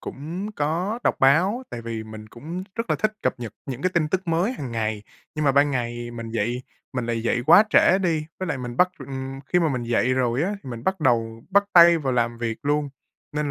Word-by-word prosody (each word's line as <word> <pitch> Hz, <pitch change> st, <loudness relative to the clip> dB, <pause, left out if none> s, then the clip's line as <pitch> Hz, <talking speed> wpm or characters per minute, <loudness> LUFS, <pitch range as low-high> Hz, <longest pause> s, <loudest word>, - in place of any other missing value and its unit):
cũng 175 Hz, +9 st, -6 dB
có 175 Hz, +10 st, -1 dB
đọc -, -, +2 dB
báo, 180 Hz, -, +4 dB
tại 115 Hz, -, -6 dB
vì 115 Hz, -1 st, -5 dB
mình 110 Hz, 0 st, -10 dB
cũng 165 Hz, -, -7 dB
rất 230 Hz, +1 st, -4 dB
là -, -, +3 dB
thích 215 Hz, 0 st, 0 dB
cập -, -, +1 dB
nhật 115 Hz, -3 st, -6 dB
những 130 Hz, -1 st, -5 dB
cái 185 Hz, -, +2 dB
tin 155 Hz, -3 st, +2 dB
tức 185 Hz, 0 st, -2 dB
mới 175 Hz, +9 st, +1 dB
hàng 135 Hz, -, -6 dB
ngày. 110 Hz, -2 st, -2 dB, 0.3 s
Nhưng 155 Hz, -, -2 dB
mà 140 Hz, -, +4 dB
ban 145 Hz, +1 st, +4 dB
ngày 120 Hz, -2 st, -3 dB
mình 115 Hz, -1 st, -7 dB
dậy 120 Hz, +3 st, -1 dB, 0.3 s
mình 125 Hz, -2 st, -2 dB
lại 115 Hz, -1 st, -2 dB
dậy 120 Hz, +1 st, 0 dB
quá 210 Hz, -, +8 dB
trễ 190 Hz, -, +5 dB
đi, 165 Hz, -5 st, 0 dB
với 185 Hz, -, -2 dB
lại 140 Hz, -5 st, -2 dB
mình 120 Hz, -1 st, -6 dB
bắt, 180 Hz, -, +5 dB
ừm 135 Hz, 0 st, -6 dB
khi 180 Hz, -, +2 dB
mà 165 Hz, -2 st, +2 dB
mình 125 Hz, -3 st, -2 dB
dậy 120 Hz, +2 st, +1 dB
rồi 125 Hz, +2 st, +1 dB
á 190 Hz, -, 0 dB
thì 130 Hz, -, -8 dB
mình 115 Hz, 0 st, -7 dB
bắt 190 Hz, -1 st, 0 dB
đầu 115 Hz, -4 st, +1 dB
bắt 200 Hz, +1 st, +4 dB
tay 170 Hz, -1 st, +8 dB
vào 135 Hz, -4 st, -1 dB
làm 120 Hz, -1 st, 0 dB
việc 115 Hz, -1 st, -3 dB
luôn, 145 Hz, 0 st, 0 dB, 0.4 s
nên 150 Hz, -1 st, -1 dB
135 Hz, 240 wpm, -24 LUFS, 120-170 Hz, 0.4 s, quá